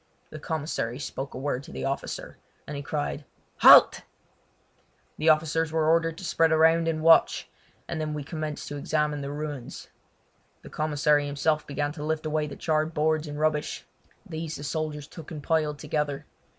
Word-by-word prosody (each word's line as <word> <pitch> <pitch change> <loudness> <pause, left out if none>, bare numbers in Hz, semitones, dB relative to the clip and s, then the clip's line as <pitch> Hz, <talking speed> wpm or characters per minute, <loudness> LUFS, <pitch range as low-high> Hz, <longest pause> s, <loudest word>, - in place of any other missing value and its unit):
The 155 - -8
commissary 150 -6 -3
spoke 135 -1 -6
a - - -5
word 135 -1 -2
to - - -12
the 65 0 -5
officer, - - -4 0.3
and 150 - -6
he 140 - -4
cried: 145 0 -3 0.3
"Halt!" - - +8 1.2
The 155 - 0
soldiers 160 +1 +3
were 160 -1 +1
ordered 165 0 +2
to - - -9
spread 165 -2 +2
around 160 +1 +4
and 155 -1 -1
watch, 165 0 +4 0.4
and 160 - -3
then 155 -1 -3
we 150 - -4
commenced 155 0 -5
to 145 - -5
examine 150 0 -1
the 140 - -4
ruins. 145 -3 -6 0.7
The - - -12
commissary 150 -1 +1
himself 150 +2 0
began 145 +1 -2
to 150 -1 -7
lift 155 +1 -2
away 155 0 0
the 140 - -8
charred 155 0 -1
boards 155 +1 +1
and 145 0 -6
rubbish. 155 -1 -1 0.4
These 160 0 -5
the 145 - -8
soldiers 150 0 -3
took 160 -2 -11
and 150 -3 -7
piled 155 -2 0
together. 150 -1 -2
150 Hz, 175 wpm, -27 LUFS, 145-160 Hz, 1.2 s, Halt